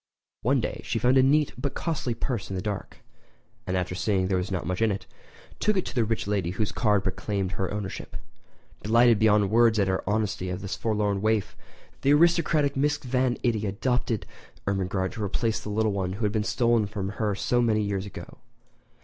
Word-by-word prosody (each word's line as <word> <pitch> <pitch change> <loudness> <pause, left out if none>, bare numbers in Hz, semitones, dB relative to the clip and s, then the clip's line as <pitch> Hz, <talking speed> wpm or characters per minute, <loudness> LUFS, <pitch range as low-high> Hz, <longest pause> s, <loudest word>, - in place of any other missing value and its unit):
One - - +2
day - - -4
she - - -2
found 130 +2 +4
a - - +7
neat 145 +3 +3
but 140 +1 -3
costly 140 -8 -2
purse 115 -3 -3
in 95 - -4
the 90 - -2
dark; 105 -2 -5 0.7
and 95 - 0
after 90 0 -2
seeing 95 +2 0
that - - 0
there 95 - +2
was 90 - -3
not 90 -5 -2
much 90 +4 -2
in 115 - +4
it, 100 -1 -3 0.5
took 210 -1 +2
it 185 - 0
to - - -6
the 120 - +2
rich 110 0 -1
lady 100 -4 0
whose 100 +3 -2
card 105 -4 +2
proclaimed 95 0 -2
her 95 -2 -2
ownership. 100 -2 -5 0.7
Delighted 115 +1 +4
beyond 105 -2 +4
words 115 -1 +5
at 100 - +3
the 95 0 0
honesty 105 -3 -1
of 90 +1 -4
this 95 0 -4
forlorn 105 -3 0
waif, 110 -1 0 0.5
the 140 - +4
aristocratic 155 -2 +3
Mrs. 145 +2 0
Van 125 -1 +1
Itty 110 -4 +1
adopted 115 +2 -1 0.4
Ermengarde 95 -1 -1
to 110 - -5
replace 110 +3 -1
the - - -7
little 110 +1 +1
one 95 -2 -2
who 105 +3 -2
had 105 - +1
been 105 -1 0
stolen 115 -1 +2
from 100 -2 -4
her 105 -3 +1
so 120 +5 +1
many 110 -2 +2
years 100 -1 -2
ago. - - -10
105 Hz, 205 wpm, -26 LUFS, 95-120 Hz, 0.7 s, a